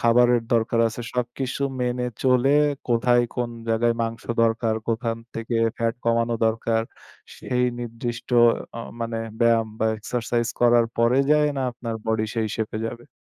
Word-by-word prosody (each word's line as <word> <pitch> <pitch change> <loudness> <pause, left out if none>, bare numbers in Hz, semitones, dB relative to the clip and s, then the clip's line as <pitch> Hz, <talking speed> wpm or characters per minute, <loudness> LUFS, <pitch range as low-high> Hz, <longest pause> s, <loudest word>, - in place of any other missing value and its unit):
খাবারের 120 0 +4
দরকার 115 0 +2
আছে। 115 - -7
সবকিছু 125 +2 -2 0.2
মেনে 125 0 -1 0.2
চলে 130 +1 +3 0.4
কোথায় 120 +1 +3
কোন 120 -1 -2 0.2
জায়গায় 115 +1 +2
মাংস 115 0 -4 0.2
দরকার, 115 0 +1
কোথান 115 0 -1 0.2
থেকে 115 +1 -3 0.2
ফ্যাট 115 0 0
কমানো 115 0 +1
দরকার 115 0 0 0.5
সেই 125 0 -1 0.2
নির্দিষ্ট 120 0 -5 0.5
অ - - -3 0.2
মানে 115 0 -2 0.2
ব্যায়াম 115 -1 +4
বা 110 - +1
এক্সারসাইজ 120 +1 -1
করার 120 -1 +5
পরে 120 +3 +4
যেয়ে 150 -1 +4
না, 135 - -1
আপনার 115 -1 -5
বডি 110 -1 +1
সেই 110 -2 0
সেপে 110 -1 -3
যাবে। 120 +1 -8
115 Hz, 145 wpm, -24 LUFS, 115-120 Hz, 0.5 s, করার